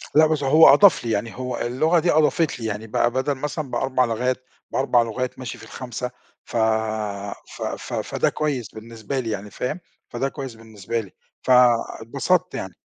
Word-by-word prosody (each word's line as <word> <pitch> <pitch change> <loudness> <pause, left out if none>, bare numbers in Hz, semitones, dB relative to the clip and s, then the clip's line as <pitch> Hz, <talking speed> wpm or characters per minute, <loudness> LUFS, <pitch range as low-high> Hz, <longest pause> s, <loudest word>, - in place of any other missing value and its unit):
لأ 155 +1 +7
بس 155 -2 0
هو 155 +4 +8
أضاف 200 -9 +6
لي، 115 - -1
يعني 110 +1 -2
هو 125 -1 -3
اللغة 155 +8 +2
دي 170 +2 +2
أضافت 155 -1 +2
لي، 115 - -5
يعني 110 +1 -4
بقى 120 +2 +1
بدل 130 +3 0
مثلًا 150 0 -4
ب4 130 -1 +1
لغات 125 +3 -1 0.3
ب4 130 -3 +3
لغات 125 +3 -3
ماشي 125 - -6
في - - -14
الخامسة 125 0 -6 0.3
ف - - -4 1.0
ف - - -12 0.2
ف - - -8
فده - - 0
كويّس 140 -6 -2
بالنسبة 115 +3 -5
لي 120 -3 -3
يعني، 105 -1 -4
فاهم؟ 125 - -3 0.3
فده 135 +3 -2
كويّس 135 -4 -7
بالنسبة 110 0 -5
لي، 100 -5 -8 0.3
فاتبسطت 125 +7 +2
يعني. 95 -2 -5
125 Hz, 175 wpm, -23 LUFS, 115-140 Hz, 1.0 s, هو